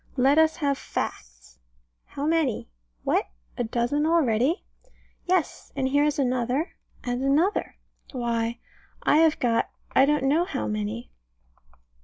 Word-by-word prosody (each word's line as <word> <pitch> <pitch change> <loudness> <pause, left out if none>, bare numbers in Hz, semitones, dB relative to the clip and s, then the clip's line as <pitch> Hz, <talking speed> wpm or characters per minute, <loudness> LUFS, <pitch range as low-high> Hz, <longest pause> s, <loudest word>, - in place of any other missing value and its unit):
Let 270 +4 +5
us 320 0 +4
have 280 -3 0
facts. 60 -1 -6 0.5
How 285 - -5
many? 310 - 0 0.3
What! - - +1 0.3
a - - -1
dozen 240 +6 0
already? 300 - +2 0.6
Yes 360 -4 0
and 270 -1 0
here 285 +2 +3
is 300 -1 0
another, 255 +3 0 0.3
and 245 0 -2
another. 305 +9 +1 0.4
Why, 235 -2 -1 0.5
I - - +4
have 320 -1 +4
got 230 -2 +1 0.3
I 270 - +7
don't 295 -1 +1
know 295 +5 +3
how 110 - -3
many. 105 +2 -3
270 Hz, 130 wpm, -26 LUFS, 235-300 Hz, 0.6 s, I